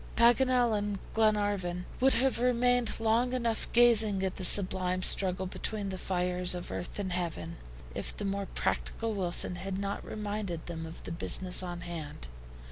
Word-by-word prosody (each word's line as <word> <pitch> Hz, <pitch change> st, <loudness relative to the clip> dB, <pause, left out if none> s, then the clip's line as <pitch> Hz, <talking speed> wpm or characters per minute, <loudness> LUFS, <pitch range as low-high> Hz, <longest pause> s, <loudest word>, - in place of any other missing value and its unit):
Paganel 245 Hz, 0 st, +3 dB
and 205 Hz, -1 st, -3 dB, 0.2 s
Glenarvan 205 Hz, -5 st, 0 dB
would 265 Hz, +1 st, +4 dB
have 265 Hz, -1 st, +1 dB
remained 245 Hz, -1 st, +1 dB
long 230 Hz, +3 st, +1 dB
enough 235 Hz, -3 st, -2 dB
gazing 220 Hz, -5 st, +4 dB
at 190 Hz, -1 st, -3 dB
the 185 Hz, -, -4 dB
sublime 185 Hz, -1 st, +6 dB
struggle 185 Hz, -1 st, +2 dB
between 200 Hz, +2 st, -4 dB
the 190 Hz, -, -5 dB
fires 180 Hz, -1 st, -1 dB
of 175 Hz, -, -7 dB
earth 180 Hz, -, -6 dB
and 195 Hz, -3 st, -4 dB
heaven, 170 Hz, -1 st, -5 dB, 0.4 s
if -, -, -6 dB
the 205 Hz, -, -5 dB
more 200 Hz, 0 st, -3 dB
practical 225 Hz, -1 st, -3 dB
Wilson 180 Hz, -2 st, +2 dB
had 190 Hz, +1 st, -5 dB
not 200 Hz, 0 st, -4 dB
reminded 205 Hz, -5 st, -5 dB
them 165 Hz, -1 st, -7 dB
of 160 Hz, -, -11 dB
the -, -, -8 dB
business 180 Hz, +2 st, +1 dB
on 175 Hz, -1 st, -7 dB
hand. 155 Hz, -, -7 dB
195 Hz, 160 wpm, -29 LUFS, 180-225 Hz, 0.4 s, sublime